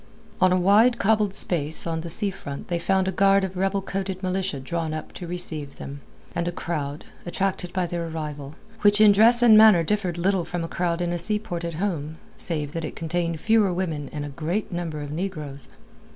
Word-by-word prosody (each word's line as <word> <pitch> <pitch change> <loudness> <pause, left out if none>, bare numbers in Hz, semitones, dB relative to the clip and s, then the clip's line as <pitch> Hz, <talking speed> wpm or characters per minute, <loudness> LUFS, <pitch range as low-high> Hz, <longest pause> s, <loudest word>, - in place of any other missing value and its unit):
On 185 - +5
a 185 - +4
wide 210 +7 +5
cobbled 210 -2 +2
space 160 -3 0
on 165 -1 -2
the 170 - -6
sea 200 +4 +1
front 140 -6 -8
they 175 -1 0
found 190 +2 +1
a - - +1
guard 195 +1 +4
of 190 0 -3
red 190 +2 0
coated 190 -1 -4
militia 185 -5 -1
drawn 160 +3 -3
up 155 - -7
to 175 - -7
receive 160 -5 -4
them, 140 +1 -8 0.3
and 170 0 -2
a - - 0
crowd 150 -4 -4 0.2
attracted 180 0 -2
by 185 -1 0
their 170 -1 -3
arrival 150 -3 -6 0.3
which 205 0 +4
in 215 -1 +8
dress 230 +4 +5
and 225 -2 +8
manner 215 -6 +7
differed 185 -1 -1
little 185 +1 +1
from 175 0 -4
a - - -3
crowd 175 0 -1
in 175 0 -1
a 175 - -2
seaport 195 -2 -1
at 170 -1 -4
home 160 -4 -3 0.2
save 150 -4 -1
that 165 +1 -4
it 155 - -5
contained 165 0 -2
fewer 215 0 +3
women 165 -6 -3
and 145 -1 -4
a - - -6
great 170 +9 -3
number 170 -4 -4
of 145 - -7
negroes. 155 -5 -5
175 Hz, 210 wpm, -24 LUFS, 160-195 Hz, 0.3 s, in